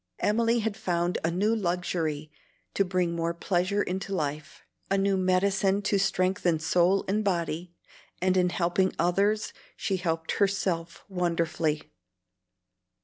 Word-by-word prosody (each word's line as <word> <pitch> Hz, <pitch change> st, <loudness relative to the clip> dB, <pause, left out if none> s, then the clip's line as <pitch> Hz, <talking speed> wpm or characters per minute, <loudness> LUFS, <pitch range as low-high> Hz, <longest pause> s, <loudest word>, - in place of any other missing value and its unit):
Emily 230 Hz, +2 st, +2 dB
had 215 Hz, -1 st, -2 dB
found 175 Hz, -4 st, -1 dB
a 165 Hz, -, +2 dB
new 205 Hz, +6 st, +1 dB
luxury 170 Hz, -6 st, -2 dB, 0.4 s
to 195 Hz, -, +3 dB
bring 180 Hz, -2 st, 0 dB
more 170 Hz, 0 st, -1 dB
pleasure 185 Hz, +3 st, 0 dB
into 190 Hz, +1 st, -3 dB
life, 150 Hz, -2 st, -4 dB, 0.3 s
a 195 Hz, -, +2 dB
new 195 Hz, 0 st, +2 dB
medicine 190 Hz, +1 st, +2 dB
to 200 Hz, 0 st, +1 dB
strengthen 185 Hz, -3 st, +1 dB
soul 175 Hz, +4 st, +2 dB
and 210 Hz, +3 st, +1 dB
body; 175 Hz, -2 st, -2 dB, 0.4 s
and 185 Hz, 0 st, +2 dB
in 180 Hz, -1 st, +3 dB
helping 175 Hz, +2 st, +1 dB
others, 200 Hz, +5 st, +1 dB, 0.2 s
she 195 Hz, -1 st, -1 dB
helped 165 Hz, -2 st, -2 dB
herself 185 Hz, -4 st, 0 dB
wonderfully. 170 Hz, -4 st, -1 dB
185 Hz, 130 wpm, -27 LUFS, 170-195 Hz, 0.4 s, to